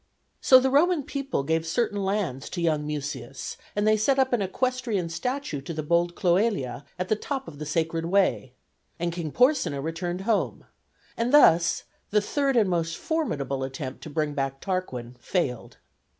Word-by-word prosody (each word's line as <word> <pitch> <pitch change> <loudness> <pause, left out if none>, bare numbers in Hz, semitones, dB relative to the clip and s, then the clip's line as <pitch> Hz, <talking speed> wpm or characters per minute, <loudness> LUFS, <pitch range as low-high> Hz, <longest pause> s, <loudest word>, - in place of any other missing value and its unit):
So 260 - +8
the 265 +1 +1
Roman 315 +2 +3
people 275 - -2
gave 160 +3 0
certain 205 +4 -1
lands 190 -9 -2
to - - -5
young 155 -3 +1
Mucius, 145 -2 -5 0.2
and 205 +1 +1
they 215 - +5
set 265 +6 +2
up 265 -1 +2
an 240 - +2
equestrian 230 -3 -1
statue 250 - -3
to 160 +4 -6
the 155 - -3
bold 170 +2 +1
Cloelia 180 - +1
at 180 0 -2
the 215 - +2
top 270 +4 -4
of 145 -3 -10
the 150 - -5
Sacred 165 +1 -1
Way. 180 -8 +1 0.5
And 170 0 -1
King 165 -3 -4
Porsenna 250 - +2
returned 175 +4 -3
home; 215 +1 0 0.5
and 235 +2 0
thus 170 - +5 0.3
the 210 - +3
third 275 +5 0
and 215 -4 +4
most 165 -2 -1
formidable 140 - -2
attempt 135 0 -5
to - - -8
bring 150 0 -1
back 135 -1 -2
Tarquin 130 -11 -4
failed. 125 -7 -2
175 Hz, 170 wpm, -26 LUFS, 150-230 Hz, 0.5 s, So